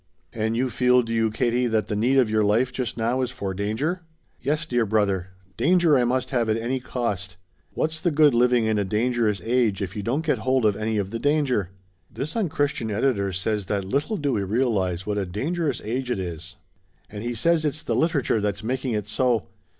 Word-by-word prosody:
"And 110 +1 -1
you 130 0 0
feel, 125 +2 +4
do 115 0 -4
you, 115 -1 +2
Katie, 120 +3 +1
that 110 -2 0
the 105 - -2
need 125 +6 +2
of 130 -3 +5
your 110 0 +2
life 115 +5 +2
just 125 -1 -3
now 120 +3 0
is 125 - 0
for 100 -6 -4
danger?" 110 - -2 0.4
"Yes, 150 +5 -1
dear 120 -6 +1
brother. 100 -4 +1 0.3
Danger 170 -2 +4
I 125 -2 +3
must 125 +1 -1
have 120 -4 +1
at 110 - +2
any 120 +3 -2
cost. 100 -7 -3 0.4
What's 155 0 -1
the 175 - +2
good 150 -3 +4
living 120 -1 +3
in 110 -1 +1
a - - +1
dangerous 110 +1 0
age 115 -4 +1
if 95 -1 -4
you 105 - -3
don't 135 +10 -1
get - - +1
hold 130 -2 +1
of 105 -2 +3
any 110 +1 -1
of 100 -1 -2
the 115 - -3
danger? 140 - +1 0.4
This 145 +4 -5
unchristian 145 - -1
editor 105 -2 0
says 100 +2 -2
that 100 -1 -1
little 145 - -1
do 145 -5 0
we 105 - 0
realize 100 -4 0
what 105 -1 -1
a 100 - -1
dangerous 140 - -2
age 125 +4 -2
it 125 - 0
is. 85 -1 -6 0.5
And 105 0 -8
he 120 0 -3
says 165 +7 +2
it's 150 +1 -2
the - - -1
literature 140 -9 +1
that's 105 0 -2
making 130 +1 -2
it 105 -2 -1
so. 115 -4 0
115 Hz, 210 wpm, -24 LUFS, 105-130 Hz, 0.5 s, of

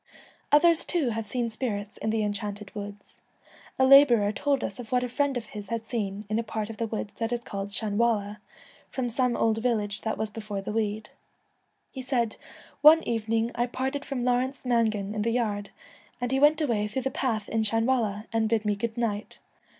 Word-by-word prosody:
Others 330 +3 +5
too 325 -8 +1
have 225 -1 -4
seen 235 +1 -2
spirits 215 -3 -4
in 220 - -2
the 220 0 +1
En 205 0 0
chanted 205 -1 -6
Woods. 205 0 -9 0.6
A 260 - +4
labourer 260 -7 +7
told 280 +4 0
us - - -4
of 235 -3 -8
what 250 -1 +2
a - - -1
friend 275 +2 0
of 235 - -5
his 205 -2 -7
had 230 -1 -3
seen 210 -3 -3
in 215 +2 0
a - - -1
part 220 0 -4
of 220 - -10
the 230 - -1
woods 215 -1 -4
that 225 0 -1
is 240 -1 -2
called 200 -2 -5
Shanwalla, 210 0 0 0.5
from 245 -2 -2
some 250 0 +2
old 225 0 +2
village 215 -4 -1
that 220 - -2
was 220 -1 -3
before 210 -2 -5
the 195 - -5
wood. 215 0 -2 0.8
He 265 - -6
said, 245 -4 -1 0.2
' - - -23
One 325 +1 +2
evening 225 0 0
I 240 +1 0
parted 265 +3 -3
from 255 -4 -3
Lawrence 255 +2 0
Mangan 220 -4 +1
in 215 - -2
the 230 - +1
yard, 205 -4 -1 0.5
and 245 0 -2
he 265 - +2
went 300 +2 +5
away 225 -8 +1
through 250 +5 -3
the 265 - -1
path 230 -6 -1
in 225 - 0
Shanwalla, 225 -1 +1
an' 225 -1 +2
bid 220 -1 0
me 210 -1 +1
good 225 +3 -4
night. 220 -3 -2
225 Hz, 205 wpm, -27 LUFS, 210-250 Hz, 0.8 s, labourer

